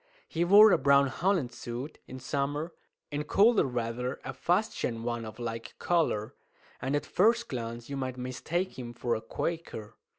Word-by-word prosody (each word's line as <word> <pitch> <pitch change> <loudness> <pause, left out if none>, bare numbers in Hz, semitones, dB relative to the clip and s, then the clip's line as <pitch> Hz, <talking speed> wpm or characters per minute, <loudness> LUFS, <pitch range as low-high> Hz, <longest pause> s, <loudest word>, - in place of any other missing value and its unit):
He 165 - -1
wore 205 +4 +8
a - - +4
brown 140 0 +5
holland 170 -3 0
suit 120 +6 -6
in 130 - -8
summer, 145 +5 -2 0.4
in 145 +1 -2
colder 205 - +4
weather 125 +1 -3
a - - -4
fustian 175 - 0
one 120 -1 -2
of 110 - -9
like 115 -1 -5
colour, 155 -12 0 0.5
and 135 - 0
at 145 0 -1
first 230 +7 +3
glance 120 -2 -5
you 140 - -4
might 130 -1 -3
mistake 130 +8 -3
him 120 -1 -6
for 120 0 -1
a 110 - -2
Quaker. 160 -9 -4
135 Hz, 165 wpm, -29 LUFS, 120-170 Hz, 0.5 s, wore